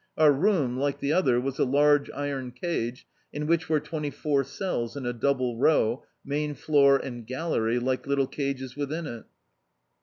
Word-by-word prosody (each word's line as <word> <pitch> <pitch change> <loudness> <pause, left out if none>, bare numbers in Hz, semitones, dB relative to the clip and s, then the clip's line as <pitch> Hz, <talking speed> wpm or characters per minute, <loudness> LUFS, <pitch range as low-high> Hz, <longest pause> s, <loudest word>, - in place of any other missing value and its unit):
Our 155 -1 +6
room, 145 - +1
like 140 0 0
the 140 +2 0
other, 130 -10 +3
was 135 +1 -3
a - - +4
large 145 +2 +3
iron 135 -3 -4
cage, 125 -4 -3 0.3
in 150 +1 -4
which 165 +1 +1
were 155 -1 +3
twenty 150 0 -4
four 140 -1 0
cells 135 - -3
in 135 - -5
a 120 - -1
double 125 -1 0
row, 125 -4 +3 0.2
main 145 +1 -2
floor 140 -2 +4
and 120 -4 -7
gallery, 130 -5 -1
like 130 +2 -1
little 140 -1 +2
cages 135 -2 -4
within 150 +3 -3
it. 120 -5 -7
140 Hz, 175 wpm, -27 LUFS, 125-150 Hz, 0.3 s, Our